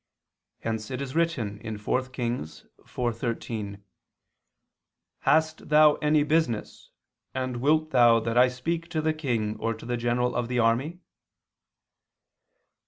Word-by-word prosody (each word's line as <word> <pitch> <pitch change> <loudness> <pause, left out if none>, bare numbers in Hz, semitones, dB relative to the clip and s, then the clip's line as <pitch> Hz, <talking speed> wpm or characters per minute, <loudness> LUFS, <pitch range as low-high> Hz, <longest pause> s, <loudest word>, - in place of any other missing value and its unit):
Hence 110 -1 -3
it 130 -1 -4
is 135 -1 -5
written 115 -10 -1
(4 105 +5 0
Kings 120 - -4
4:13): 115 -4 -4 1.4
"Hast 160 -1 +1
thou 150 0 +7
any 150 -1 +3
business, 150 -8 -1 0.5
and 130 -1 -2
wilt 155 +5 +2
thou 120 -3 +6
that 115 +1 -3
I 125 +1 +6
speak 165 +7 -3
to 155 - -1
the 155 0 +2
king 120 -9 -2
or 115 0 -1
to 110 - -12
the 120 0 -2
general 120 +1 0
of 120 -1 -1
the 125 0 -2
army?" 120 +8 +1
125 Hz, 125 wpm, -27 LUFS, 115-150 Hz, 1.4 s, thou